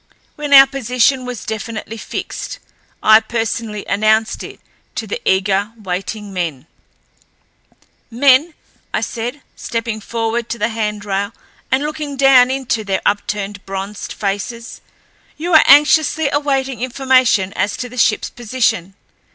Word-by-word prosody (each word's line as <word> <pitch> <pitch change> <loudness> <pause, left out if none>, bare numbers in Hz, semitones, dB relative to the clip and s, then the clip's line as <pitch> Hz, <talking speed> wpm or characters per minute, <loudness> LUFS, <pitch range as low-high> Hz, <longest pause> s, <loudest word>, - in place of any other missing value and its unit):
When 295 -1 -5
our 270 -1 +10
position 255 -1 +1
was 245 -3 -6
definitely 220 +1 -5
fixed - - -6 0.5
I 215 0 +8
personally 225 -2 -3
announced 215 +2 +1
it - - -9 0.4
to - - -3
the 475 - -5
eager, 195 +2 0
waiting 195 +1 -5
men. 160 -7 -3 1.4
"Men," 275 +6 +3 0.4
I - - 0
said, 245 +5 -4
stepping 230 -2 -4
forward 230 +1 -2
to 235 - -3
the 230 - 0
handrail 210 -2 -2 0.4
and 260 +2 +2
looking 300 -2 -4
down 265 -2 +6
into 260 -4 -1
their 195 -2 -2
upturned, 205 -1 -2
bronzed 195 +1 -5
faces, 210 +4 -4 0.6
"you 340 +3 -3
are 315 - +8
anxiously 300 +1 +5
awaiting 270 -4 -1
information 255 -6 +2
as 200 +2 -1
to 250 - -4
the 250 - -12
shipl's 225 -3 +1
position. 220 -6 -1
230 Hz, 125 wpm, -17 LUFS, 205-265 Hz, 1.4 s, our